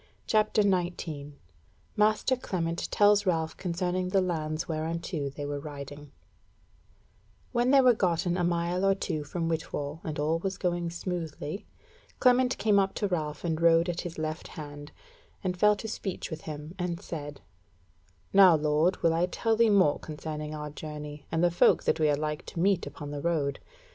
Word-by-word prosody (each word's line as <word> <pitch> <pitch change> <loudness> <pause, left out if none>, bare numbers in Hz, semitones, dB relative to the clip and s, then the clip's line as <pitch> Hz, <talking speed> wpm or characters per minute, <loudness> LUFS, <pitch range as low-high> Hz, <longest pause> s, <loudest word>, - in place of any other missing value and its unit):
CHAPTER 215 -1 +3
19 170 -6 -2 0.6
Master 215 +4 +3
Clement 170 -8 -3
Tells 205 -1 +4
Ralph 160 -3 0
Concerning 180 0 -2
the 195 - +3
Lands 160 -4 -2
Whereunto 160 -1 -3
They 145 +1 -6
Were 145 0 -3
Riding 145 0 -8 1.4
When 245 0 +2
they 275 0 +7
were 250 -1 +6
gotten 175 -4 +1
a 180 - 0
mile 175 +1 0
or 195 0 +4
two 160 -6 -3
from 165 +3 -3
Whitwall, 155 -2 -3
and 155 -2 -4
all 155 +3 +1
was 190 +1 -3
going 175 -2 -1
smoothly, 170 0 -5 0.5
Clement 250 0 +4
came 210 -2 +3
up 195 0 0
to 205 - 0
Ralph 150 -5 -2
and 165 -2 -1
rode 170 +1 +5
at 175 - -2
his 175 -2 -7
left 155 +1 -4
hand, 145 -2 -9 0.5
and 185 -1 -1
fell 210 +3 +4
to 215 +2 -6
speech 195 -5 -4
with 160 0 -5
him, 150 +2 -7
and 175 -1 -2
said: 150 -7 -7 0.9
"Now, 190 -3 +8
lord, 155 +4 +1
will 165 -1 +4
I 170 +2 +2
tell 225 +4 0
thee 230 0 +4
more 190 -8 +4
concerning 155 0 -6
our 150 -1 -5
journey, 150 -1 -8
and 165 +1 +1
the 175 - +4
folk 175 - +4
that - - +1
we 155 -1 +3
are 145 - +2
like 150 0 -3
to - - -6
meet 195 +1 +2
upon 145 -2 -7
the 145 -1 -4
road. 155 -4 0
170 Hz, 175 wpm, -28 LUFS, 150-185 Hz, 1.4 s, Now